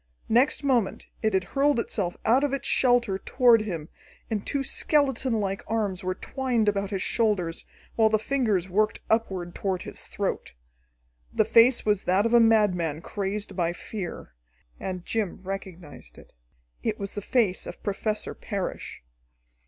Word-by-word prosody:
Next 255 +6 +3
moment 245 -8 +1 0.2
it 220 -3 +1
had 190 - +2
hurled 275 +6 +1
itself 190 -6 -2
out 250 +5 +4
of 285 -2 0
its 275 - -2
shelter 245 -6 +3
toward 240 0 +4
him, 170 -8 -4 0.4
and 210 -2 -1
two 280 -1 -2
skeletonlike 255 -9 +1
arms 210 -4 -1
were 185 0 -1
twined 245 -1 -1
about 200 -1 +1
his 195 -2 -2
shoulders, 200 -8 0 0.3
while 220 -1 +5
the 215 - +3
fingers 215 -6 0
worked 210 +3 0
upward 190 -6 0
toward 190 -2 -2
his - - -8
throat. - - -3 0.8
The 220 - +2
face 230 +3 +5
was 210 -2 +1
that 190 +4 +3
of 230 - +1
a 240 - +8
madman, 185 -9 +3
crazed 200 +3 -3
by 175 -2 0
fear. 185 0 -7 0.5
And 180 -2 -5
Jim 215 -5 -2
recognized 180 - -7
it. - - -16 0.5
It - - -1
was 200 -1 -5
the 205 - -4
face 205 -4 +1
of - - -9
Professor 210 +1 -2
Parrish. 200 - -5
210 Hz, 150 wpm, -26 LUFS, 190-230 Hz, 0.8 s, a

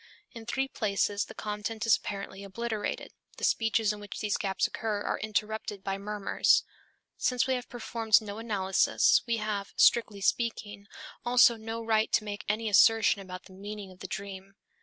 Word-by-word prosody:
In 230 -1 -10
three 270 +2 0
places 205 -3 0
the - - -12
content 210 +2 -4
is 225 - +6
apparently 200 -1 -6
obliterated, 220 +2 -4 0.3
the - - -10
speeches 225 -1 +2
in 210 - -9
which 205 -1 -8
these 210 -2 0
gaps 190 -2 0
occur 215 -2 -2
are - - -2
interrupted 215 -1 -3
by 195 0 -3
murmurs. 205 0 +2 0.5
Since 250 -1 +1
we 260 - +1
have 250 -1 -4
performed 230 -2 +2
no 210 0 -7
analysis, 195 -4 +3
we 230 -1 +1
have, 210 -2 -3
strictly 220 -4 +4
speaking, 205 -2 -1 0.4
also 245 -1 +6
no 225 +1 -6
right 220 -1 +2
to - - +3
make 205 -1 -6
any 220 +2 0
assertion 215 0 +5
about 185 -1 -8
the 190 - -16
meaning 200 0 -8
of 185 - -16
the - - -7
dream. 195 0 -7
210 Hz, 170 wpm, -29 LUFS, 200-225 Hz, 0.5 s, is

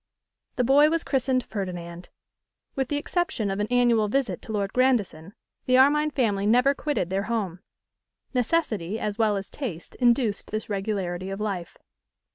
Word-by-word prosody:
The 250 - +1
boy 285 +5 +5
was 330 +1 0
christened 260 -2 0
Ferdinand. 175 -5 -6 0.6
With 265 -2 -1
the 290 - -1
exception 300 - -1
of 195 - -3
an 210 - 0
annual 240 -3 +3
visit 220 -5 -1
to - - -8
Lord 200 -2 -2
Grandison, 220 -8 +1 0.3
the 255 0 +5
Armine 300 +3 +4
family 210 -8 0
never 250 +5 +4
quitted 285 - -2
their 195 +1 -1
home. 195 -7 -2 0.7
Necessity 225 - 0
as 210 +1 -3
well 215 -2 +2
as 195 -1 -7
taste 205 - -6
induced 240 -4 +2
this 215 0 -4
regularity 195 -3 -2
of 195 +1 -5
life. 195 -5 -4
220 Hz, 155 wpm, -25 LUFS, 195-260 Hz, 0.7 s, boy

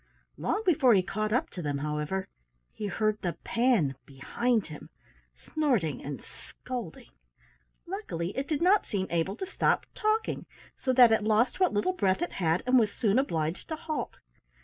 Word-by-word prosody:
Long 425 - -1
before 275 - +5
he 185 - +3
caught 215 +3 -2
up 245 - 0
to 180 - -6
them, 145 -3 -2
however, 150 +6 -2 0.5
he 210 - -4
heard 215 +2 0
the 175 -2 -1
Pan 230 - +2
behind 220 - -1
him, 150 -2 -10 0.5
snorting 235 - -1
and 140 -1 -5
scolding. 245 -1 -8 0.7
Luckily 340 - -4
it 270 +1 -2
did 310 +1 -1
not 390 +3 +4
seem 195 -2 -1
able 170 +3 0
to 380 - -4
stop 385 - +1
talking, 435 0 -1 0.3
so 260 - -1
that 250 -2 +7
it 220 - +3
lost 220 - +2
what 370 -2 +4
little 210 - +1
breath 195 - +1
it 350 - -3
had 165 -1 0
and 255 0 +5
was 215 -3 +2
soon 220 +1 +2
obliged 165 - -2
to 320 - -3
halt. 310 0 -4
215 Hz, 170 wpm, -29 LUFS, 175-270 Hz, 0.7 s, that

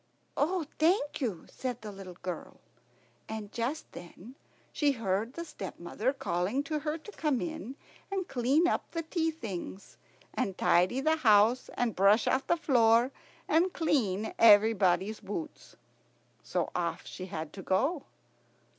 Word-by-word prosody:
"Oh, 340 +2 0
thank 315 -2 +2
you," 205 -11 -2
said 250 -2 -5
the 210 - -6
little 190 -3 -10
girl; 180 -2 -6 0.7
and 215 -2 -6
just 250 +7 -3
then 180 +7 -11 0.4
she 290 -2 +2
heard 225 0 -1
the 335 +2 -5
stepmother 195 - -3
calling 225 0 -1
to 300 +1 -2
her 305 +1 -2
to 330 +6 -12
come 300 -9 0
in 315 -6 -5 0.4
and 385 -2 -2
clean 270 +7 +2
up - - -1
the 330 -1 -3
tea 325 0 0
things, 190 - -7 0.4
and 190 -2 -2
tidy 185 +10 +3
the 315 +2 +2
house, 225 -1 +4
and 235 -4 0
brush 200 +4 +5
out 265 +1 +1
the 340 - +3
floor, 240 -5 +4 0.4
and 340 +4 +3
clean 220 - 0
everybody's 205 -2 +5
boots. 220 - -7 0.7
So - - -2
off - - -2
she 185 - -7
had 160 -4 -6
to 195 - -8
go. 270 - 0
240 Hz, 145 wpm, -30 LUFS, 195-310 Hz, 0.7 s, brush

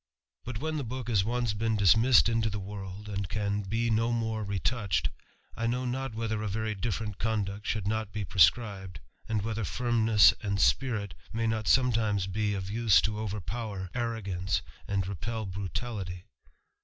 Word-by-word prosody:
But 125 -2 -4
when 155 +4 -2
the 145 - -2
book 125 0 -5
has 100 -5 +3
once 120 0 0
been 110 +1 0
dismissed 110 +6 +6
into 115 -1 +1
the 105 - -3
world, 100 +1 -7
and 100 -3 -3
can 105 -1 -1
be 115 +4 -1
no 115 +2 +2
more 110 -2 -1
retouched, 100 +1 0 0.4
I 115 - -1
know 125 +2 0
not 130 -1 -3
whether 110 -1 -2
a 110 - -2
very 110 +2 -1
different 105 0 -3
conduct 105 -2 -2
should 105 -3 -1
not 110 -1 -1
be 105 0 -3
prescribed, 95 0 +2 0.3
and 110 -3 0
whether 110 0 -2
firmness 115 0 +4
and 100 -3 -1
spirit 110 -7 +2 0.2
may 115 0 -1
not 110 -2 -1
sometimes 110 -6 +3
be 105 +2 -1
ot 95 0 -4
use 110 -6 +5
to 105 0 -1
overpower 100 -1 -4
arrogance 100 -6 -1 0.2
and 100 -2 0
repel 110 +4 -4
brutality. 95 0 -4
110 Hz, 165 wpm, -29 LUFS, 100-115 Hz, 0.4 s, dismissed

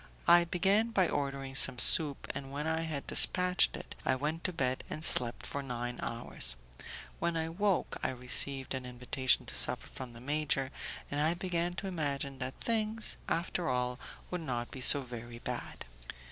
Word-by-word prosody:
I 175 0 +7
began 195 +6 +1
by 190 -6 +2
ordering 140 -1 -3
some 135 -2 +4
soup, 145 +3 +5
and, 135 -1 -7
when 145 +2 -4
I 160 0 0
had 155 -4 -4
dispatched 180 0 +4
it, - - -10
I 130 - +1
went 150 +5 -3
to 185 - 0
bed 130 -6 -2
and 155 - +2
slept 120 -1 +4
for 140 - -4
nine 120 -2 -5
hours. 115 - -4 0.6
When 170 -1 -1
I 160 0 -2
woke, 195 +2 -1
I - - 0
received 130 +2 +2
an 130 -1 -5
invitation 125 +1 +1
to - - -5
supper - - +2
from 125 -2 -9
the 115 - -12
major, 140 0 -1 0.4
and 145 - -2
I 160 +3 +1
began 175 -1 -2
to 195 - -5
imagine 140 -6 -3
that 130 +1 -6
things, 220 -1 -1
after 170 0 -1
all, 125 0 -2 0.3
would 180 -1 -3
not 120 -6 -4
be 130 - -8
so 140 +2 +7
very 120 -2 -9
bad. - - -6
140 Hz, 175 wpm, -31 LUFS, 125-170 Hz, 0.6 s, I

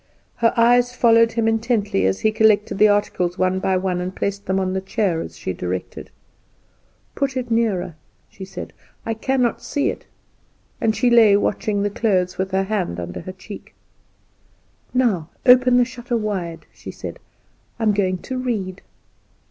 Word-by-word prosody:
Her 230 -1 +3
eyes 245 +1 +4
followed 230 -1 +4
him 230 -1 0
intently 225 - +1
as 95 0 -1
he 220 - +3
collected 215 -2 +2
the 215 - +7
articles 195 -4 0
one 185 0 +1
by 190 0 +1
one, 185 -1 -1
and 185 +1 -5
placed 200 0 -3
them 190 0 +1
on 185 -1 -1
the 190 - -1
chair 190 -3 -1
as - - -8
she 95 - -4
directed. 90 +1 -5 1.0
"Put 275 -2 -2
it 245 -2 -4
nearer," 215 -7 0 0.3
she 195 - -11
said, 190 - -8 0.3
"I 225 - -1
cannot 250 +1 0
see 285 - -1
it;" - - -11 0.8
and 220 -1 +1
she 250 -1 +2
lay 220 -4 +6
watching 205 0 -1
the 205 - -1
clothes, 185 -5 0
with 190 0 -1
her 190 0 +1
hand 190 - -2
under 85 0 -6
her 185 - -7
cheek. 190 +2 -11 1.2
"Now 215 -11 +1 0.2
open 250 -1 +6
the 245 - +4
shutter 240 0 -4
wide," 190 -6 -4
she - - -11
said; - - -8 0.6
"I 230 - -4
am 215 -1 +3
going 190 -2 0
to 260 -1 -4
read." 200 -7 -3
205 Hz, 170 wpm, -21 LUFS, 185-235 Hz, 1.2 s, the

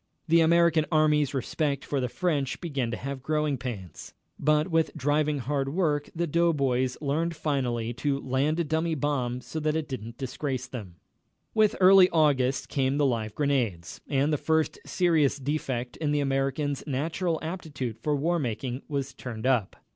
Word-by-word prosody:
The 165 +1 +5
American 165 -1 +4
Army's 150 -2 +3
respect 140 +2 -1
for 140 - -1
the 125 -1 -1
French 145 -4 -1
began 140 -9 -2
to 115 - -3
have 140 0 -5
growing 150 +1 0
pains. 100 - -7 0.2
But 150 +1 +3
what - - -10
with 165 -1 +1
driving 150 +1 +1
hard 135 +1 -1
work, 150 -6 +1
the 170 +1 0
doughboys 140 -6 +1
learned 160 +4 -1
finally 125 -6 -1
to 140 +3 -1
land 140 +5 0
a - - +2
dummy 160 +1 0
bomb 130 -4 -1
so 160 - -5
that 155 0 0
it 160 -1 -2
didn't 120 -3 -6
disgrace 130 0 -3
them. 110 -9 -8 0.6
With 215 -2 +3
early 185 0 +8
August 140 -5 +2
came 135 0 0
the 145 - +3
live 110 -5 -1
grenades, 120 - -1
and 145 +2 +1
the 150 - 0
first 160 -1 +1
serious 160 -6 +2
defect 130 -3 -3
in 150 -2 -1
the 150 - +2
American's 135 +1 -1
natural 160 +5 -1
aptitude 145 - -5
for 150 +4 0
war 170 +5 +1
making 125 0 -3
was 140 -2 -3
turned 125 -3 -7
up. 125 -7 +1
145 Hz, 170 wpm, -27 LUFS, 130-155 Hz, 0.6 s, early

